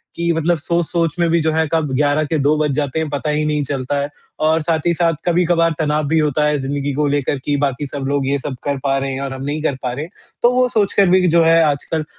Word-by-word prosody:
कि 170 Hz, 0 st, 0 dB
मतलब 165 Hz, +2 st, +1 dB
सोच-सोच 170 Hz, 0 st, -1 dB
में 170 Hz, -, +3 dB
भी 170 Hz, +1 st, +3 dB
जो 160 Hz, 0 st, +1 dB
है 160 Hz, 0 st, +1 dB
कब 160 Hz, -4 st, 0 dB
11 145 Hz, +2 st, +2 dB
के 155 Hz, +2 st, -1 dB
2 150 Hz, +2 st, +4 dB
बज 150 Hz, -1 st, 0 dB
जाते 145 Hz, +1 st, -1 dB
हैं 160 Hz, -2 st, -2 dB
पता 145 Hz, +2 st, -3 dB
ही 150 Hz, 0 st, 0 dB
नहीं 150 Hz, -1 st, 0 dB
चलता 140 Hz, 0 st, -2 dB
है 140 Hz, +1 st, -2 dB, 0.4 s
और 160 Hz, 0 st, +2 dB
साथ 160 Hz, 0 st, 0 dB
ही 170 Hz, -, +3 dB
साथ 170 Hz, 0 st, +1 dB
कभी-कभार 170 Hz, -1 st, +2 dB
तनाव 150 Hz, -1 st, 0 dB
भी 160 Hz, +2 st, +2 dB
होता 150 Hz, -1 st, +1 dB
है, 150 Hz, 0 st, +1 dB
ज़िंदगी 140 Hz, +1 st, -2 dB
को 150 Hz, +2 st, 0 dB
लेकर 145 Hz, -1 st, 0 dB
कि 145 Hz, -, +1 dB
बाकी 140 Hz, 0 st, -1 dB
सब 135 Hz, -1 st, -5 dB
लोग 140 Hz, -1 st, 0 dB
ये 140 Hz, +1 st, +1 dB
सब 130 Hz, -1 st, -5 dB
कर 140 Hz, -1 st, -1 dB
पा 135 Hz, 0 st, +1 dB
रहे 135 Hz, 0 st, -2 dB
हैं 135 Hz, -, -4 dB
और 135 Hz, -1 st, -4 dB
हम 135 Hz, 0 st, -7 dB
नहीं 150 Hz, +2 st, -3 dB
कर 140 Hz, -, 0 dB
पा 125 Hz, -, -1 dB
रहे 145 Hz, +5 st, -4 dB
हैं। 175 Hz, -, -16 dB, 0.3 s
तो 240 Hz, -, +5 dB
वो 250 Hz, 0 st, +3 dB
सोच 210 Hz, -4 st, +1 dB
कर 195 Hz, -3 st, +4 dB
भी 185 Hz, 0 st, +4 dB
जो 165 Hz, 0 st, +4 dB
है 165 Hz, 0 st, +5 dB
आजकल 150 Hz, +1 st, -1 dB
150 Hz, 275 wpm, -18 LUFS, 140-165 Hz, 0.4 s, तो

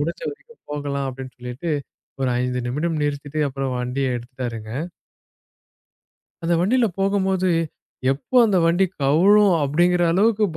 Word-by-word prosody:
முடிஞ்ச 165 Hz, +3 st, -3 dB
வரைக்கும் 465 Hz, +2 st, -15 dB
போகலாம்" 140 Hz, -1 st, -2 dB
அப்படின்னு 130 Hz, 0 st, -9 dB
சொல்லிட்டு 125 Hz, +7 st, -5 dB, 0.5 s
ஒரு 130 Hz, -1 st, +1 dB
5 125 Hz, 0 st, -1 dB
நிமிடம் 155 Hz, +5 st, -1 dB
நிறுத்திட்டு 145 Hz, +1 st, -3 dB
அப்புறம் 135 Hz, -1 st, -3 dB
வண்டியை 130 Hz, +2 st, -1 dB
எடுத்துட்டாருங்க. 120 Hz, -3 st, -6 dB, 1.7 s
அந்த 170 Hz, +1 st, +1 dB
வண்டில 235 Hz, +7 st, +3 dB
போகும் 195 Hz, 0 st, +1 dB
போது, 185 Hz, -1 st, +1 dB, 0.6 s
எப்போ 145 Hz, -, -4 dB
அந்த 200 Hz, -4 st, +2 dB
வண்டி 175 Hz, +3 st, +3 dB, 0.2 s
கவுழும்? 190 Hz, +8 st, +5 dB
அப்படிங்கிற 175 Hz, +5 st, +2 dB
அளவுக்குப் 205 Hz, -2 st, +2 dB
155 Hz, 125 wpm, -22 LUFS, 130-190 Hz, 1.7 s, கவுழும்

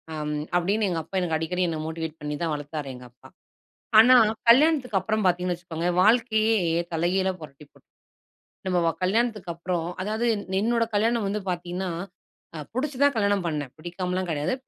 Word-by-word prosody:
அம் 150 Hz, 0 st, -3 dB, 0.2 s
அப்படின்னு 200 Hz, +4 st, +1 dB
எங்க 170 Hz, -2 st, -1 dB
அப்பா 175 Hz, -, -10 dB
எனக்கு 165 Hz, -3 st, 0 dB
அடிக்கடி 180 Hz, +3 st, -1 dB
என்ன 160 Hz, -, -3 dB
மோட்டிவேட் 160 Hz, 0 st, -5 dB
பண்ணி 150 Hz, 0 st, -3 dB
தான் 165 Hz, -2 st, 0 dB
வளர்த்தார் 145 Hz, -1 st, -5 dB
எங்க 125 Hz, 0 st, -12 dB
அப்பா. 125 Hz, -, -18 dB, 0.7 s
ஆனா 250 Hz, +3 st, +8 dB, 0.3 s
கல்யாணத்துக்கு 260 Hz, -3 st, +5 dB
அப்புறம் 215 Hz, 0 st, -1 dB
பார்த்தீங்கன்னு 180 Hz, -1 st, +1 dB
வச்சுக்கோங்க, 170 Hz, -1 st, -4 dB
வாழ்க்கையே 220 Hz, 0 st, +3 dB, 0.3 s
தலைகீழா 185 Hz, +3 st, +1 dB
புரட்டி 150 Hz, -1 st, -12 dB
போட் -, -, -25 dB, 0.8 s
நம்ம 180 Hz, -1 st, +1 dB
வ -, -, +4 dB
கல்யாணத்துக்கு 210 Hz, -1 st, 0 dB
அப்புறம் 170 Hz, 0 st, -3 dB, 0.2 s
அதாவது 215 Hz, +4 st, -1 dB, 0.3 s
என்னோட 230 Hz, +2 st, +2 dB
கல்யாணம் 225 Hz, +1 st, +1 dB
வந்து 205 Hz, +2 st, -2 dB
பார்த்தீங்கன்னா, 180 Hz, +1 st, -4 dB, 0.7 s
அ -, -, -6 dB, 0.2 s
புடுச்சு 270 Hz, +2 st, -2 dB
தான் 285 Hz, -1 st, +4 dB
கல்யாணம் 200 Hz, -3 st, +1 dB
பண்ணேன், 150 Hz, -5 st, -3 dB
பிடிக்காமலாம் 180 Hz, +2 st, -3 dB
கிடையாது.. 150 Hz, +7 st, -1 dB
180 Hz, 155 wpm, -25 LUFS, 165-220 Hz, 0.8 s, ஆனா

